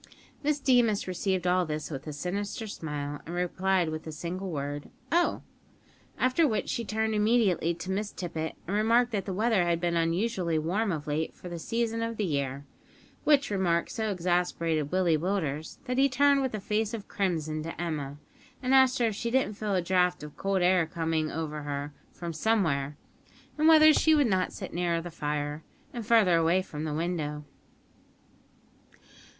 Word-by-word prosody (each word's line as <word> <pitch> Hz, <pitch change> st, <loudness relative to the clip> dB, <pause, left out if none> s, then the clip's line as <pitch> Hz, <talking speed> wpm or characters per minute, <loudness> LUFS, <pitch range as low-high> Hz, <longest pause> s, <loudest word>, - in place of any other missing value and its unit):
Miss 300 Hz, 0 st, +1 dB
Deemas 245 Hz, -8 st, +3 dB
received 185 Hz, 0 st, -1 dB
all 180 Hz, +1 st, +3 dB
this 155 Hz, -1 st, -4 dB
with 135 Hz, +1 st, -6 dB
a -, -, -3 dB
sinister 200 Hz, -, -3 dB
smile, 145 Hz, -7 st, -5 dB
and 170 Hz, -, -6 dB
replied 180 Hz, 0 st, +1 dB
with 155 Hz, 0 st, -4 dB
the 160 Hz, -, -7 dB
single 175 Hz, +5 st, -5 dB
word, 145 Hz, -2 st, -4 dB, 0.2 s
"Oh!" 345 Hz, +2 st, +2 dB, 0.7 s
after 255 Hz, +6 st, +3 dB
which 220 Hz, -5 st, -1 dB
she 235 Hz, -, -1 dB
turned 220 Hz, 0 st, -1 dB
immediately 210 Hz, -6 st, +2 dB
to 180 Hz, +3 st, -5 dB
Miss 205 Hz, +2 st, -2 dB
Tippet, 160 Hz, -3 st, -4 dB
and 195 Hz, -, -2 dB
remarked 230 Hz, +3 st, +3 dB
that 205 Hz, -3 st, -2 dB
the 195 Hz, -, -3 dB
weather 215 Hz, 0 st, +2 dB
had 170 Hz, -1 st, +1 dB
been 170 Hz, 0 st, 0 dB
unusually 170 Hz, +1 st, 0 dB
warm 190 Hz, +7 st, 0 dB
of 150 Hz, -4 st, -3 dB
late 155 Hz, +2 st, -2 dB
for 180 Hz, -, -9 dB
the 170 Hz, -1 st, -5 dB
season 230 Hz, +4 st, -1 dB
of 230 Hz, 0 st, -3 dB
the 210 Hz, -, 0 dB
year, 140 Hz, -3 st, -2 dB, 0.6 s
which 285 Hz, -6 st, +4 dB
remark 175 Hz, -4 st, +1 dB
so 220 Hz, -2 st, -2 dB
exasperated 170 Hz, -4 st, 0 dB
Willie 175 Hz, -4 st, +2 dB
Willders 160 Hz, -4 st, -2 dB
that 250 Hz, +1 st, -1 dB
he 275 Hz, +1 st, +5 dB
turned 280 Hz, +1 st, +4 dB
with 260 Hz, -4 st, -1 dB
a -, -, -3 dB
face 215 Hz, +3 st, -1 dB
of 210 Hz, -, -8 dB
crimson 160 Hz, -5 st, -1 dB
to 165 Hz, +1 st, -6 dB
Emma, 150 Hz, -5 st, -3 dB, 0.5 s
and 255 Hz, +1 st, +1 dB
asked 265 Hz, 0 st, +6 dB
her 240 Hz, -, +2 dB
if 220 Hz, -3 st, 0 dB
she 235 Hz, +3 st, -2 dB
didn't 250 Hz, -3 st, +1 dB
feel 205 Hz, -1 st, -2 dB
a 180 Hz, -, +1 dB
draught 180 Hz, -2 st, +2 dB
of 150 Hz, -1 st, -9 dB
cold 195 Hz, -2 st, 0 dB
air 180 Hz, -2 st, +4 dB
coming 160 Hz, -1 st, -1 dB
over 155 Hz, -2 st, -4 dB
her 145 Hz, 0 st, -4 dB, 0.2 s
from 170 Hz, -1 st, -6 dB
somewhere, 155 Hz, -9 st, 0 dB, 0.6 s
and 310 Hz, +1 st, +2 dB
whether 310 Hz, -1 st, +8 dB
she 315 Hz, +1 st, +4 dB
would 290 Hz, -2 st, +4 dB
not 190 Hz, -5 st, +1 dB
sit 190 Hz, -, -7 dB
nearer 170 Hz, -1 st, 0 dB
the 175 Hz, +1 st, -7 dB
fire, 150 Hz, -1 st, -3 dB, 0.3 s
and 235 Hz, -3 st, -6 dB
farther 210 Hz, -7 st, +5 dB
away 170 Hz, +3 st, +3 dB
from 150 Hz, -3 st, -6 dB
the 155 Hz, -, -2 dB
window! 155 Hz, -3 st, -2 dB
180 Hz, 180 wpm, -28 LUFS, 160-220 Hz, 0.7 s, whether